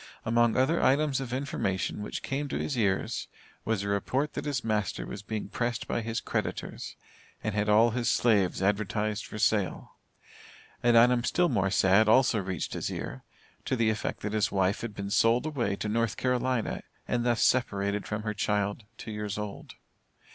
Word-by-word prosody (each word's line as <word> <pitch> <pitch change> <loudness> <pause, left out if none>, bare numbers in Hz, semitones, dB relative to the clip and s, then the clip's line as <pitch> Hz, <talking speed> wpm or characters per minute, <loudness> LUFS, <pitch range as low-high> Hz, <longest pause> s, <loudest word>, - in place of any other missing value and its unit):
Among 120 +1 +3
other 145 +6 +3
items 140 0 +2
of 130 -2 -5
information 105 -9 -2
which 105 - -5
came 145 +2 -2
to - - -3
his 145 - -2
ears, 100 -5 0 0.4
was 110 -2 0
a - - -3
report 130 +9 0
that - - -4
his 140 -4 -1
master 105 -3 -1
was 100 - -7
being 110 +1 -4
pressed 120 +2 -2
by 120 - -1
his 115 0 -2
creditors, - - -4 0.5
and 110 - -1
had 105 0 0
all 110 +3 +5
his 120 0 0
slaves 100 -7 +2
advertised 105 +1 0
for - - -7
sale. 105 -3 0 0.8
An 120 -1 +4
item 120 +1 +5
still 175 +7 +2
more 95 -7 +1
sad 100 +3 +4
also 125 -1 +5
reached 95 -4 -3
his - - -2
ear, 65 - -5 0.4
to - - 0
the 115 -2 +2
effect 110 - -3
that 105 +1 -3
his 110 -2 +1
wife 95 0 +1
had 115 -3 -5
been 100 0 -5
sold 115 +4 +3
away 125 -10 -1
to 105 - -4
North 115 0 0
Carolina, 125 -2 0 0.3
and 120 -1 0
thus 120 -2 +2
separated 100 -5 +1
from 105 0 -3
her 105 -1 -2
child, 105 +1 -1
two 110 - -7
years 105 -1 -4
old. 105 -1 -6
110 Hz, 180 wpm, -29 LUFS, 100-120 Hz, 0.8 s, all